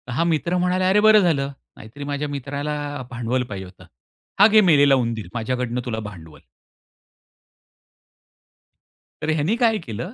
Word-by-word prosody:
हा 165 - +1
मित्र 170 +2 0
म्हणाला, 180 +1 +1
"अरे, 205 +2 +4
बरं 215 0 +6
झालं 140 -6 0 0.3
नाहीतरी 120 +7 -10
माझ्या 145 +1 -3
मित्राला 145 +1 -4 0.2
अ, - - -6
भांडवल 125 +1 -2
पाहिजे 95 -2 -6
होतं. 90 0 -16 0.5
हा 205 - +8
घे 215 0 +5
मेलेला 145 -6 +5
उंदीर 115 -5 -2
माझ्याकडनं 125 +1 -2
तुला 110 -2 -3
भांडवल." 80 -6 -14 2.8
तर 155 - -3
ह्यांनी 155 +8 +1
काय 230 -3 +2
केलं 120 - -6
140 Hz, 140 wpm, -22 LUFS, 120-175 Hz, 2.8 s, हा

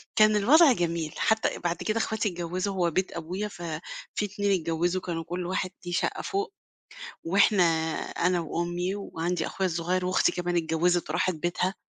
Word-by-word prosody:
كان 215 0 +6
الوضع 280 +9 +6
جميل، 170 -4 -2
حتّى 220 0 +1
بعد 175 0 -1
كده 215 +5 -1
إخواتي 220 -1 0
اتجوّزوا 180 +3 -3
هو 175 -2 +1
بيت 185 +4 0
أبويا 180 +5 -4
ففي 170 -5 -6 0.5
2 205 0 -1
اتجوّزوا 170 +3 0
كانوا 165 -2 -3
كلّ 175 +2 -4
واحد 185 0 -2
ليه 175 - -4
شقّة - - 0
فوق، 400 +1 -2 0.7
وإحنا 195 +2 +4 0.4
أنا 180 0 0
وأمي 175 +3 -2
وعندي 175 -3 -2
أخويا 190 -1 -1
الصغيّر 175 +2 -1
وأختي 185 0 +3
كمان 175 -1 -1
اتجوّزت 170 +1 +1
وراحت 175 +2 +1
بيتها، 175 +3 -1
180 Hz, 155 wpm, -27 LUFS, 170-200 Hz, 0.7 s, كان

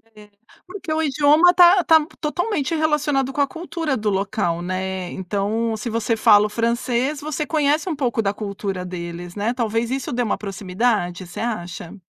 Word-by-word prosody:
É, 210 -1 -15 0.4
porque 370 -3 -7
o 315 - 0
idioma 300 +4 +4
tá 355 +1 +6
tá 320 -2 +5
totalmente 330 -1 -1
relacionado 295 -4 +1
com 285 - 0
a 280 - +3
cultura 325 -2 -3
do 215 -1 -1
local 195 -3 -1
né 185 0 -3
então 210 +4 -2
se 235 - -4
você 230 +1 0
fala 210 -2 +6
o - - -11
francês 235 +5 -1
você 300 0 -3
conhece 305 +3 +1
um 325 - -2
pouco 245 -5 0
da 200 -2 0
cultura 200 -3 -4
deles 175 -1 -7
não 205 0 -3
é 235 - +1
talvez 230 -1 -1
isso 265 0 -3
dê 245 - 0
uma 220 - -1
proximidade, 195 -2 -2
você 175 - -9
acha? 180 -7 -5
230 Hz, 180 wpm, -21 LUFS, 200-300 Hz, 0.4 s, tá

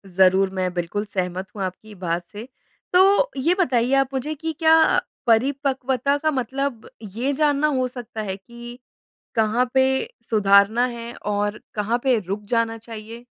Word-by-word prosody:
ज़रूर 190 +1 +4
मैं 185 -1 -1
बिल्कुल 180 +4 -3
सहमत 185 0 -2
हूँ 200 - -3
आपकी 200 +3 -7
बात 175 -1 -3
से। 215 +4 -8 0.5
तो 395 +7 +5
ये 330 +7 +2
बताइए 250 -5 +2
आप 270 -1 +2
मुझे 280 +4 -2
कि 320 +2 -4
क्या 320 0 +6 0.5
परिपक्वता 265 +2 +1
का 310 +2 0
मतलब 265 -1 -3 0.3
ये 265 +5 0
जानना 295 0 +2
हो 255 -1 +1
सकता 240 -3 -7
है 190 -2 -3
कि 240 +4 -11 0.6
कहाँ 230 +3 +2
पे 265 0 +5 0.5
सुधारना 205 +2 +4
है 235 -1 -6 0.2
और 205 +1 -1
कहाँ 215 +3 0
पे 260 -3 +3
रुक 195 +2 -5
जाना 230 -1 +1
चाहिए? 225 +1 -10
235 Hz, 150 wpm, -22 LUFS, 205-265 Hz, 0.6 s, क्या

